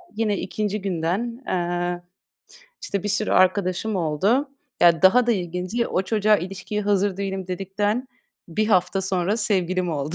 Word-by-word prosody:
yine 210 -3 0
2. 210 +1 -3
günden, 195 +8 -2
eee, 175 0 -1 0.8
işte, 200 -2 -2
bir 205 - -2
sürü 215 +1 +1
arkadaşım 185 +2 +2
oldu. 195 - +1 0.3
Ya, 170 0 +5
daha 235 +6 +6
da 240 - +4
ilginci 180 +5 -2
o 185 - 0
çocuğa 210 +1 +3
ilişkiye 195 +3 -4
hazır 200 -1 +1
değilim 195 -2 -4
dedikten 205 +7 -2 0.4
1 215 +6 0
hafta 190 0 +2
sonra 190 +2 0
sevgilim 185 -4 +1
oldu. 150 +2 -3
195 Hz, 140 wpm, -23 LUFS, 180-210 Hz, 0.8 s, daha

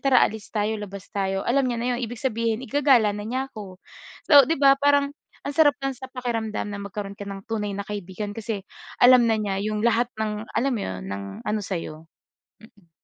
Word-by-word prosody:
"Tara 255 - +7
alis 220 -1 -8
tayo, 215 0 0
labas 200 -1 -8
tayo." 195 -1 -1
alam 275 +3 +3
niya 235 - -2
na 240 - -2
'yon, - - -3
ibig 235 0 -4
sabihin 230 -1 -1
igagala 260 -8 +4
na 205 - -5
niya 255 +5 -2
ako. 190 -4 -9 0.5
So 285 -2 +9
di 325 - +1
ba, 275 -1 +7
parang 285 0 +3 0.3
ang 285 - -3
sarap 290 -4 +5
lang 270 -1 -1
sa 260 +2 -9
pakiramdam 230 -4 -3
na 200 - -5
magkaroon 200 0 -6
ka 205 - -7
ng 195 0 -8
tunay 210 -2 -2
na 200 - -5
kaibigan, 205 0 -5
kasi 220 -3 -4 0.3
alam 250 -1 +7
na 220 - +2
niya 200 -2 -2
'yong 215 +1 -2
lahat 235 +1 +2
ng 215 0 -3
alam 270 +2 +2
mo 215 - -2
'yon, 95 0 -4
ng 100 0 -5 0.2
ano 210 0 0
sa'yo. 165 -4 -5 0.5
Mm. 205 -6 -20
220 Hz, 205 wpm, -24 LUFS, 200-250 Hz, 0.5 s, So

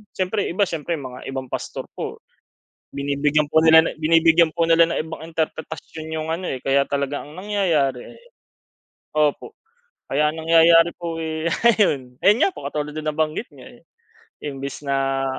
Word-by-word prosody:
siyempre 190 +2 -1
iba 190 +4 +1
siyempre 165 +1 -3
mga 130 -2 -9
ibang 135 -1 -5
pastor - - -5
po - - -6 0.7
binibigyang 145 +2 0
po 160 - +6
nila 160 0 +7
na - - -2
binibigyan 165 +1 +4
po 165 +1 0
nila 165 0 +4
ng - - -2
ibang 160 0 -8
interpretasyon 160 0 -5
yung 160 0 -4
ano, 180 +2 -4
eh, 130 - -3
kaya 135 +2 +1
talaga 140 0 -2
ang 150 +3 -13
nangyayari, 170 -11 -1
eh 475 - -21 0.9
opo, 150 - -1 0.5
kaya 150 +2 +1
ang 160 - -7
nangyayari 165 +1 +6
po, 165 -1 -5
eh, 160 +1 -2 0.2
ayun 130 - 0
ayun 210 +4 +6
nga - - +5
po 385 - -9
katulad 150 0 -4
din 155 - -5
ng 155 - -1
nabanggit 155 +7 -1
niyo, 130 -3 -13
eh, 120 - -17 0.6
imbis 140 0 -6
na 135 -1 0
155 Hz, 170 wpm, -22 LUFS, 140-165 Hz, 0.9 s, nila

